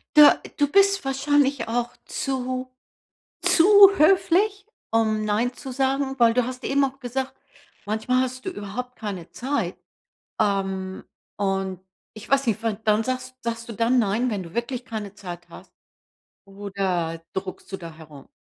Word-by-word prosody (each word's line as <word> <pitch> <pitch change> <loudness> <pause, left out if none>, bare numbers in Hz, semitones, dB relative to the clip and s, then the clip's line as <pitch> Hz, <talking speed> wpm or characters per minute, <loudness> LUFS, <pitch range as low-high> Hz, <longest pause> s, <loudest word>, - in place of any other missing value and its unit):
Da 300 -1 +8 0.2
du 290 - +3
bist 395 0 +4
wahrscheinlich 270 -1 +1
auch 240 +1 -1 0.2
zu 255 -1 -3 0.7
zu 330 - +4 0.3
höflich, 390 +4 +3 0.3
um 220 -1 +1
nein 220 +4 0
zu 265 - -8
sagen, 270 +1 0
weil 230 -1 +5
du 250 0 +2
hast 255 +1 -7
eben 280 +1 +2
auch 270 0 -2
gesagt, 260 +1 -3 0.5
manchmal 220 +5 +1
hast 255 0 -4
du - - -1
überhaupt 250 - -6
keine 195 -6 -6
Zeit. 275 +3 -2 0.6
Ähm, 190 -2 -1 0.3
und 195 -2 -1 0.3
ich 215 +1 -11
weiß 275 -1 +2
nicht 220 -1 0
wa 225 -1 +1
dann 215 +1 +1
sagst 255 +1 -4
sagst 230 0 -4
du - - -5
dann 230 +4 +2
nein, 225 +3 +1
wenn 200 -5 -3
du 170 - -12
wirklich 245 +1 -3
keine 215 -5 -6
Zeit 175 -3 -9
hast - - -14 0.7
oder 190 -4 -3
druckst 190 0 -6
du - - -2
da 170 -3 -9
herum. 150 -3 -14
235 Hz, 155 wpm, -24 LUFS, 200-265 Hz, 0.7 s, Da